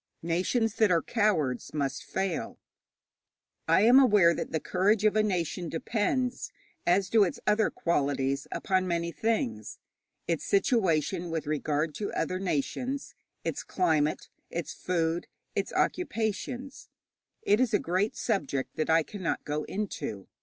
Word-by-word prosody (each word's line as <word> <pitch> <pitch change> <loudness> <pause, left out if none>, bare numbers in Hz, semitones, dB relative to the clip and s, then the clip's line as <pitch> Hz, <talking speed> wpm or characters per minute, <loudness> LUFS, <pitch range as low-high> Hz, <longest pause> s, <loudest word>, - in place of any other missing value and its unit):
Nations 190 +7 +1
that 220 -2 +4
are 170 -2 +3
cowards 165 - 0
must 140 -2 -2
fail. 190 -1 -3 1.1
I - - +5
am 240 +5 +7
aware 205 -10 +6
that - - -4
the 160 - 0
courage 200 +6 +1
of 215 - +4
a 215 - +5
nation 180 -4 -1
depends, 235 +8 -1 0.4
as 185 +2 +3
do 220 +1 +5
its 180 - -2
other 210 +1 +3
qualities, 140 -4 0
upon 185 -1 0
many 170 -1 -1
things: 120 - -2 0.5
its 165 -3 -1
situation 185 - +1
with 165 -1 -3
regard 150 +1 -1
to 205 - -2
other 185 - -1
nations, 220 - -2 0.3
its - - -2
climate, 155 -5 0 0.2
its 170 -2 -4
food, 170 -1 -1 0.3
its - - -2
occupations. 250 - -2 0.5
It 205 +2 +3
is 255 -3 +2
a 210 - +4
great 185 +5 0
subject 145 - -2
that 155 - -1
I 160 0 +5
cannot 185 0 -4
go 150 +1 -2
into. 185 - -4
180 Hz, 140 wpm, -29 LUFS, 160-215 Hz, 1.1 s, am